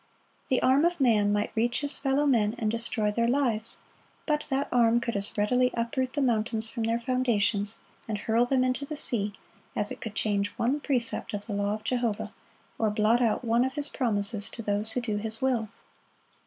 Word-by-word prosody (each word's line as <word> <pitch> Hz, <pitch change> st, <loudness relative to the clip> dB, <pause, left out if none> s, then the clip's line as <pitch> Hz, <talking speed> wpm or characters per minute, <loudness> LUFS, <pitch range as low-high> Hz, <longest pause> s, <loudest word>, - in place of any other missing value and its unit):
The 260 Hz, -, +2 dB
arm 265 Hz, +3 st, +4 dB
of 345 Hz, 0 st, +1 dB
man 215 Hz, -6 st, +3 dB
might 205 Hz, 0 st, 0 dB
reach 240 Hz, +3 st, +1 dB
his 285 Hz, 0 st, 0 dB
fellow 275 Hz, +1 st, +1 dB
men 225 Hz, -5 st, +2 dB
and 215 Hz, -2 st, 0 dB
destroy 230 Hz, -2 st, 0 dB
their 235 Hz, +2 st, +1 dB
lives; 235 Hz, -4 st, 0 dB, 0.5 s
but 300 Hz, -1 st, -1 dB
that 275 Hz, +1 st, 0 dB
arm 235 Hz, -1 st, +4 dB
could 235 Hz, -1 st, -3 dB
as 200 Hz, +3 st, -1 dB
readily 250 Hz, +5 st, +3 dB
uproot 255 Hz, +2 st, -1 dB
the 290 Hz, -, 0 dB
mountains 225 Hz, -2 st, +1 dB
from 235 Hz, -, -4 dB
their 230 Hz, +1 st, 0 dB
foundations, 230 Hz, -5 st, +1 dB, 0.3 s
and 215 Hz, -2 st, -2 dB
hurl 230 Hz, +3 st, +1 dB
them 260 Hz, 0 st, +2 dB
into 255 Hz, +2 st, 0 dB
the 295 Hz, +2 st, -5 dB
sea, 210 Hz, -7 st, -1 dB, 0.4 s
as 210 Hz, -, 0 dB
it -, -, -7 dB
could 220 Hz, -2 st, -6 dB
change 205 Hz, -2 st, +1 dB
one 260 Hz, +5 st, +1 dB
precept 240 Hz, -5 st, 0 dB
of 205 Hz, -, -6 dB
the 215 Hz, -, -5 dB
law 200 Hz, +1 st, 0 dB
of 215 Hz, -, -10 dB
Jehovah, 240 Hz, -4 st, -1 dB, 0.5 s
or 220 Hz, -, +2 dB
blot 215 Hz, +3 st, +2 dB
out 235 Hz, +1 st, +1 dB
one 235 Hz, +1 st, +3 dB
of 260 Hz, +1 st, -2 dB
His 290 Hz, -1 st, +1 dB
promises 205 Hz, -4 st, -1 dB
to 230 Hz, -, -8 dB
those 210 Hz, +1 st, +1 dB
who 250 Hz, -, -1 dB
do 215 Hz, -4 st, -2 dB
His 220 Hz, +1 st, 0 dB
will. 245 Hz, -5 st, 0 dB
230 Hz, 200 wpm, -28 LUFS, 215-255 Hz, 0.5 s, arm